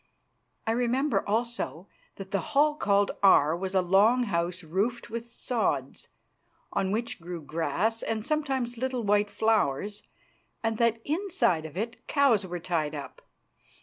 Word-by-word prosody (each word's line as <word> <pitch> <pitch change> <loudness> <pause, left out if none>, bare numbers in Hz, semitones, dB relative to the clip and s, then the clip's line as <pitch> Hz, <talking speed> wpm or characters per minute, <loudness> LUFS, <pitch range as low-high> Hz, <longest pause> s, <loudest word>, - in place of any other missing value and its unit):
I 225 - +1
remember 250 +5 +1
also 220 -5 -2 0.3
that 195 -1 -9
the 200 - +1
hall 295 +5 +2
called 200 -8 +2
Aar 160 -5 +6
was 190 +2 -4
a 185 - +4
long 205 +7 +4
house 175 -3 -1
roofed 205 +11 -2
with 235 +1 -5
sods, 200 - -2 0.7
on 190 - 0
which 225 -1 -2
grew 175 0 -6
grass 170 +9 -1
and 220 -1 -3
sometimes 270 -6 -1
little 255 -1 -1
white 205 0 +2
flowers, 210 -2 0 0.6
and 225 -1 -1
that 230 -1 +3
inside 315 - 0
of 155 +3 -12
it 230 +4 -5
cows 245 -9 +3
were 175 0 -4
tied 160 -4 -1
up. 140 -2 -8
210 Hz, 145 wpm, -28 LUFS, 180-240 Hz, 0.7 s, Aar